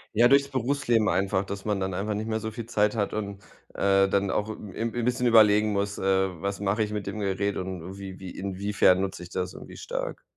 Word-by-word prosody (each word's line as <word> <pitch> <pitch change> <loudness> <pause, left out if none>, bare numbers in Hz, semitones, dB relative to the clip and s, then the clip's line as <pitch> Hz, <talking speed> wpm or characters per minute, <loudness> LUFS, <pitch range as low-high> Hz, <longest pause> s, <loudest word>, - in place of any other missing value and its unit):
Ja, 120 +2 +6
durchs 140 +1 +4
Berufsleben 120 -4 +1
einfach, 95 0 +1
dass 100 +1 -6
man 105 -2 0
dann 95 -1 -2
einfach 105 +3 -2
nicht 110 - -3
mehr 110 0 -1
so 110 0 -4
viel 115 +1 -7
Zeit 105 -2 +1
hat 105 -2 -1
und, 100 -2 -4 0.3
äh, 95 0 +3
dann 100 -1 +1
auch 105 +1 -1
'n 105 -3 -8
'n 115 +1 -2
bisschen 125 0 +1
überlegen 105 -2 +6
muss: 100 0 -1
„Äh, 95 -3 +1
was 100 0 -2
mache 100 +2 0
ich 105 - 0
mit 105 -2 -3
dem 110 - -5
Gerät 100 0 -1
und 90 -2 -5
und 95 +3 -8
wie 95 -1 -8
wie 95 -2 -7
inwiefern 100 -1 +2
nutze 95 -2 -3
ich 90 - -9
das 90 0 -3
irgendwie - - -11
stark?" - - -5
100 Hz, 230 wpm, -27 LUFS, 95-110 Hz, 0.3 s, Ja